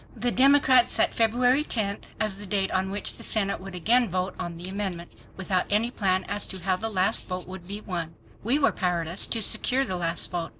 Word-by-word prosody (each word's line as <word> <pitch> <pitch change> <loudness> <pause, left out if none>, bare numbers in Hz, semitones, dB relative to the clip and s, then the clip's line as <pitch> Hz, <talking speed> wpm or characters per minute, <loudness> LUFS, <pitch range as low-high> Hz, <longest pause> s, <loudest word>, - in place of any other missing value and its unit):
The 240 +1 -1
Democrats 265 -2 +4
set - - +2
February 245 +5 +2
10 205 -8 -2 0.2
as 215 -2 +1
the 205 - -6
date 195 -1 +1
on 190 0 -1
which 205 +1 0
the - - -9
Senate 200 -4 0
would 195 -1 -8
again 235 +7 +3
vote 185 +1 -2
on 170 -1 -5
the 175 +2 -6
amendment, 190 -3 -5 0.3
without 185 -1 -1
any 220 +4 +1
plan 190 -5 0
as 205 +1 -3
to 190 - -4
how 185 0 +1
the 225 +3 -3
last 190 -3 +2
vote 180 -1 -5
would 185 -1 -10
be 205 +2 -6
won. 170 -5 -5 0.3
We 240 +7 +2
were 295 - +2
powerless 175 -1 0
to 225 -2 +1
secure 265 +6 +2
the 185 - -2
last 170 0 -2
vote. 175 -2 -3
195 Hz, 215 wpm, -25 LUFS, 185-225 Hz, 0.3 s, Democrats